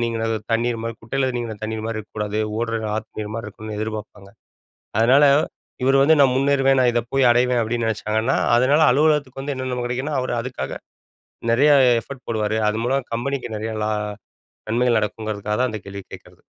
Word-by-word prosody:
நீங்க 115 -1 -2 0.3
தண்ணீர் 115 +1 +1
மாரி 115 0 -3
குட்டையில 130 +3 -1
நீங்கின 115 -2 -4
தண்ணீர்மாரி 110 0 -3
இருக்கக்கூடாது. 105 0 -4 0.2
ஓடுற 115 -1 -1 0.2
ஆத்து 110 0 -7
நீர்மாரி 110 +1 -5
இருக்கணு 105 +1 -8
எதிர்ப்ப்பாங்க. 105 -2 -6 0.7
அதனால 130 +6 +5 0.6
இவரு 135 +1 +4
வந்து 155 +3 +6
நான் 135 -2 +5
முன்னேறுவேன். 135 -1 +3
நான் 125 -1 +4
இத 120 - +2
போய் 135 -2 +4
அடைவேன், 125 0 +3
அப்பிடின்னு 115 +1 -1
நினைச்சாங்கன்னா, 110 +4 0 0.2
அதனால 135 +5 +4
அலுவலகத்துக்கு 145 -1 +2
வந்து 140 +1 -3
என்னென்ன 130 -1 -4
நம்ம 125 - -3
கிடைக்குன்னா, 130 +5 -2
அவரு 130 -1 -2
அதுக்காக 125 +1 -5 0.7
நிறைய 140 +6 +4 0.3
எஃபர்ட் 135 +2 -11
போடுவாரு. 110 -1 -1
அது 105 +1 -1
மூலம் 135 0 -1
கம்பெனிக்கு 120 -1 -3
நிறைய 110 +1 -4
லா 105 - 0 0.8
நன்மைகள் 120 +1 +2
நடக்குங்கிறதுக்காக 105 0 -3
தான் 130 - +2
அந்த 110 -1 -5
கேள்விய 100 0 -8
கேட்கிறது. - - -13
120 Hz, 165 wpm, -22 LUFS, 110-130 Hz, 0.8 s, வந்து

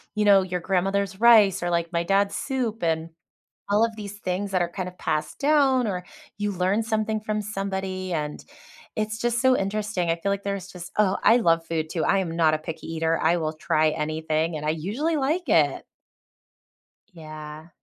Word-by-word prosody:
you 210 0 +1
know, 200 -2 +7
your 180 -1 -3
grandmother's 195 +2 -1
rice 215 -7 +6
or, 175 - 0
like, 170 0 -1
my 170 0 +1
dad's 200 +2 +1
soup 240 -5 -2
and 165 0 0 0.6
all 205 +2 +3
of 230 -1 -2
these 205 -1 -8
things 195 +1 -3
that 185 -2 +1
are 175 - -1
kind 180 +1 -5
of 180 - -13
passed 155 -1 -2
down 275 -4 +3
or 180 -3 -3 0.3
you 205 0 -1
learn 190 +3 +1
something 220 -1 -1
from 215 0 -2
somebody 190 -2 -4
and 150 -2 -3 0.5
it's 215 0 -2
just 240 0 0
so 260 0 +4
interesting. 195 -4 -1
I 165 - +1
feel 185 +4 -2
like 200 0 -3
there's 200 -2 -3
just 175 -1 -9
Oh, 195 -2 +3
I 230 - +6
love 165 -8 +2
food 160 -1 -2
too. 165 0 -2
I 195 - +3
am 175 -4 -2
not 160 -2 +3
a - - -1
picky 155 +1 -7
eater, 165 0 0
I 165 +2 +3
will 155 -2 -2
try 155 0 +1
anything, 155 +1 -1
and 150 0 -5
I - - +2
usually 210 - -1
like 305 +4 -1
it. 150 -8 +3 1.3
Yeah. 155 -1 -10
185 Hz, 195 wpm, -25 LUFS, 165-210 Hz, 1.3 s, know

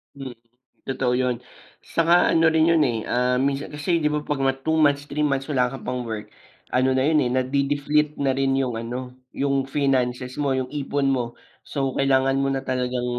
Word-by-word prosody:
Hmm, 135 -2 -7 0.6
totoo 130 -2 0
yun 125 -1 0 0.6
tsaka 165 0 +3 0.2
ano 165 0 +4
rin 160 0 +4
yun, 165 - +3
eh, 115 - -1
ah, 125 +1 +2
minsan 140 +1 -3
kasi 150 +3 -6
di - - +4
ba 150 - +1
pag 145 -2 -1 0.2
2 160 - +1
months, 145 -1 +3
3 150 - -2
months 135 0 -1
wala 125 -3 +2
ka 135 - -6
pang 125 0 -2
work, 110 -1 -4 0.5
ano 130 +1 +3
na 130 - +2
yun, 155 -1 +3
eh, 125 - 0
nade-deflate 140 +3 +1
na 135 - +3
rin 135 0 +1
yung 125 -2 -2
ano, 115 +1 -5 0.5
yung 140 0 +1 0.2
finances 130 -3 0
mo, 140 - +1
yung 130 - -2
ipon 140 0 -1
mo. 125 - 0 0.5
So 135 -2 -1
kailangan 135 0 +2
mo 135 - +1
na 135 -1 -1
talagang 125 -1 -1
135 Hz, 190 wpm, -23 LUFS, 125-145 Hz, 0.6 s, ano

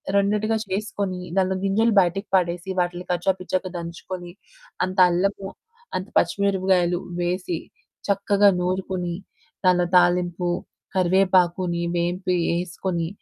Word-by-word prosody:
రెండిటిగా 210 +2 +2
చేసుకొని, 195 -2 -2 0.2
దాంట్లో 190 0 +2
గింజలు 220 +3 +2
బయటికి 195 +4 -1
పడేసి, 175 0 0
వాటిని 175 0 -1
కచ్చా 180 +2 +2
పిచ్చాగా 185 0 -2
దంచుకొని, 175 +1 -7 0.5
అంత 185 +1 -3
అల్లము, 195 +2 0 0.5
అంత 185 +2 -3
పచ్చిమిరపకాయలు, 185 -1 +2 0.2
వేసి 175 -1 -1 0.5
చక్కగా 200 0 +4
నూరుకొని, 180 -1 -2 0.5
దానిలో 180 -1 +4
తాలింపు, 175 0 +2 0.5
కరివేపాకుని 180 -1 +2
వేంపి 180 +2 0 0.2
ఏసుకొని, 175 -1 -3
185 Hz, 100 wpm, -23 LUFS, 175-195 Hz, 0.5 s, చక్కగా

